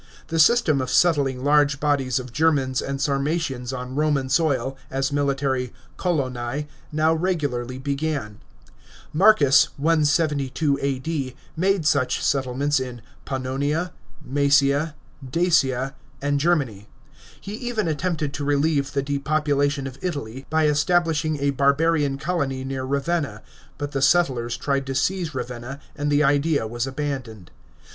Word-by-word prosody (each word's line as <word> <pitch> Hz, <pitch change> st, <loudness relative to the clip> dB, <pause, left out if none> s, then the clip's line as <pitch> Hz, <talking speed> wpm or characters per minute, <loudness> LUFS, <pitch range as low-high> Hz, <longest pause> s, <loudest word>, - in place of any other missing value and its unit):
The 165 Hz, -, -1 dB
system 155 Hz, -, +4 dB
of 130 Hz, -, -3 dB
settling 140 Hz, -7 st, +2 dB
large 145 Hz, -1 st, +3 dB
bodies 140 Hz, -4 st, +1 dB
of 125 Hz, -2 st, -6 dB
Germans 135 Hz, -4 st, +2 dB
and 135 Hz, 0 st, -4 dB
Sarmatians 140 Hz, -2 st, -1 dB
on 125 Hz, 0 st, -5 dB
Roman 145 Hz, -2 st, +1 dB
soil 135 Hz, -3 st, +1 dB
as 135 Hz, +1 st, -1 dB
military 135 Hz, -3 st, 0 dB, 0.2 s
coloni 135 Hz, -5 st, -2 dB, 0.3 s
now 155 Hz, +1 st, +2 dB
regularly 145 Hz, -8 st, -1 dB
began. 140 Hz, -5 st, -3 dB, 0.7 s
Marcus 155 Hz, -6 st, +6 dB
(172 150 Hz, -2 st, +1 dB
A.D.) 135 Hz, 0 st, -2 dB, 0.2 s
made 185 Hz, 0 st, +1 dB
such 140 Hz, -3 st, +2 dB
settlements 140 Hz, +1 st, +1 dB
in 125 Hz, -3 st, -6 dB, 0.2 s
Pannonia, 140 Hz, +6 st, -2 dB, 0.4 s
Mcesia, 140 Hz, +2 st, +2 dB, 0.3 s
Dacia, 135 Hz, -3 st, +1 dB, 0.3 s
and 145 Hz, 0 st, 0 dB
Germany. 140 Hz, -, 0 dB, 0.5 s
He 200 Hz, -, -8 dB
even 225 Hz, -3 st, -2 dB
attempted 155 Hz, -2 st, -1 dB
to 145 Hz, -, -4 dB
relieve 145 Hz, 0 st, +1 dB
the 140 Hz, -1 st, 0 dB
depopulation 145 Hz, 0 st, 0 dB
of 135 Hz, 0 st, -7 dB
Italy 135 Hz, -7 st, -5 dB
by 160 Hz, 0 st, +2 dB
establishing 155 Hz, 0 st, +2 dB
a 140 Hz, 0 st, +1 dB
barbarian 140 Hz, +1 st, +2 dB
colony 140 Hz, -4 st, -2 dB
near 135 Hz, 0 st, -4 dB
Ravenna, 140 Hz, +3 st, -1 dB, 0.3 s
but 145 Hz, 0 st, -4 dB
the 135 Hz, -, -2 dB
settlers 130 Hz, -6 st, +2 dB
tried 140 Hz, -1 st, -1 dB
to 135 Hz, -, -3 dB
seize 170 Hz, +2 st, -1 dB
Ravenna, 125 Hz, +2 st, -5 dB, 0.2 s
and 145 Hz, 0 st, -1 dB
the 145 Hz, +1 st, +4 dB
idea 145 Hz, -1 st, +2 dB
was 120 Hz, +3 st, -3 dB
abandoned. 130 Hz, -, -5 dB
140 Hz, 125 wpm, -23 LUFS, 130-155 Hz, 0.7 s, Marcus